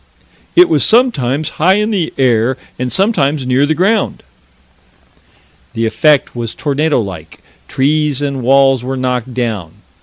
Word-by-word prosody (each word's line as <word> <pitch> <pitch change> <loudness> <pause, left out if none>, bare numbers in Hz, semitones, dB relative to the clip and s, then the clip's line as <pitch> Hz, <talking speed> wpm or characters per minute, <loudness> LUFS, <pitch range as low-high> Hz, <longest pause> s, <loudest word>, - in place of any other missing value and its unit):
"It 355 0 +7
was 335 - +1
sometimes 155 - +1
high 185 +4 +4
in 210 +2 0
the 185 -6 -1
air 125 -1 +1 0.2
and 125 0 -3
sometimes 155 - +1
near 130 +3 +1
the 155 - 0
ground." 200 +5 0 1.5
The 115 0 -1
effect 145 +6 +2
was 115 -2 -5
tornado 150 0 0
like: 90 -7 -7 0.3
trees 145 +1 0
and 140 -2 -3
walls 135 0 +3
were 130 +1 -4
knocked 125 -1 -3
down. 110 -10 -3
135 Hz, 140 wpm, -14 LUFS, 125-155 Hz, 1.5 s, It